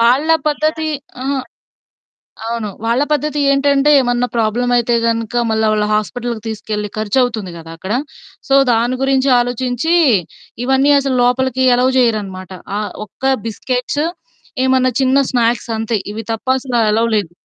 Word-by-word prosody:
వాళ్ళ 255 +7 +3 0.2
పద్ధతి 310 +1 -1 0.3
ఆహా! 275 +1 -1 1.1
అవును. 230 -2 -3 0.2
వాళ్ళ 235 +4 +2
పద్ధతి 300 0 0
ఏంటంటే 280 +1 +3
ఏమన్నా 245 0 0
ప్రాబ్లమ్ 235 +2 0
అయితే 240 0 +2
గనక 230 0 -1
మళ్ళీ 220 0 +1
వాళ్ళ 210 -1 +1
హాస్పిటల్‌కి 225 +3 -2
తీసుకెళ్ళి 210 -1 -4
ఖర్చువుతుంది 220 -2 0
కదా! 165 0 -10
అక్కడ. 190 +5 -4 0.5
సో 275 - +3 0.2
దాని 235 +2 +1
గురించి 270 0 +2
ఆలోచించి 245 +6 0 0.7
ఇవన్నీ 265 +2 +3
అసలు 270 -1 -1
లోపలికి 260 +1 +1
ఎలవ్ 255 +1 +2
జేయరనమాట. 200 -7 -1 0.3
ఆహ్, 210 0 -3
ఒక్క 265 +6 -1
బిస్కెట్స్ 250 +6 -2 0.6
ఏమన్నా 260 -1 +2
చిన్న 260 +1 +3
స్నాక్స్ 235 -2 0
అంతే. 225 0 -1 0.2
ఇవి 220 0 -6
తప్ప 225 - -7
అసలు 255 -2 -3
అలవ్‌లేదు. 215 -5 0
245 Hz, 130 wpm, -16 LUFS, 220-265 Hz, 1.1 s, వాళ్ళ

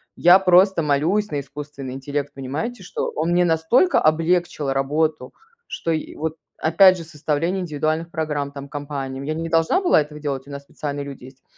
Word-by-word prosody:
я 180 +2 +6
просто 185 0 +4
молюсь 165 +8 +1
на 145 - -1
искусственный 140 -2 -8
интеллект." 145 +1 -4
Понимаете, 150 - -5
что 180 - -4
он 160 +3 -1
мне 175 +1 +4
настолько 175 - +3
облегчил 160 -2 +1
работу, 145 0 -1 0.3
что 165 - -3
и 160 -1 -3
вот, 160 +1 -4 0.2
опять 185 +4 +5
же, 165 - -7
составление 160 +3 -2
индивидуальных 155 0 -2
программ 150 -3 -3
там 140 0 -8
компаниям. 140 -2 -5
Я 155 - -2
не 165 +1 -4
должна 165 - +2
была 355 - +4
этого 150 0 -8
делать, 140 -2 -4
у - - -10
нас 140 0 -7
специальные 145 0 -5
люди 140 -3 -9
есть. 130 0 -16
155 Hz, 175 wpm, -22 LUFS, 140-170 Hz, 0.3 s, я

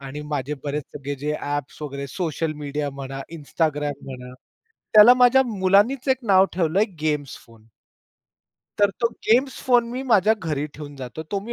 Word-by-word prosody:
आणि 140 +2 -7
माझे 145 +1 -2
बरेच 145 +1 -2
सगळे 145 0 -5
जे 150 +3 -3
ॲप्स 145 -1 -4
वगैरे 140 -1 -5
सोशल 160 +1 -2
मीडिया 145 0 -3
म्हणा, 135 0 -7
Instagram 150 -1 -1
म्हणा, 125 -1 -9 0.6
त्याला 215 +3 +9
माझ्या 250 +1 +5
मुलानीच 210 +5 +2
एक 260 - +3
नाव 195 -2 +5
ठेवलं 175 +1 +1
आहे 215 - +4
गेम्स 150 -3 -2
फोन. 115 -1 -20 1.1
तर 205 -1 +4
तो 235 - +3 0.2
गेम्स 255 +4 +2
फोन 245 -2 +3
मी 255 +2 -4
माझ्या 220 -4 +3
घरी 155 -7 -3
ठेवून 145 -1 -9
जातो, 130 +3 -7
तो 200 - -1
मी 230 +4 -7
155 Hz, 165 wpm, -23 LUFS, 145-210 Hz, 1.1 s, त्याला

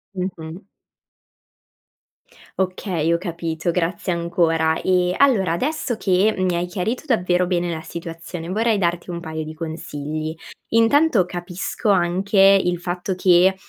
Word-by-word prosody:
Mh-mh. 180 -1 -6 1.9
Okay, 185 -3 0
ho 170 - +1
capito, 170 -2 -3
grazie 175 +2 -1
ancora; 165 -2 +1
e, 180 -1 +2
allora 225 -11 +3
adesso 265 - -1
che 200 +1 +2
mi 185 -1 +1
hai 170 +1 0
chiarito 195 - -3
davvero 180 - +2
bene 175 -1 -1
la 160 -1 -4
situazione, 165 0 -7
vorrei 220 +2 +1
darti 175 0 -1
un 170 - -4
paio 160 -2 -5
di 155 - -7
consigli; 155 -1 -5 0.3
intanto 230 - +4
capisco 180 +4 -4
anche 190 +2 +1 0.2
il 175 -1 0
fatto 180 +2 -3
che, 185 +1 +4
180 Hz, 125 wpm, -21 LUFS, 170-190 Hz, 1.9 s, intanto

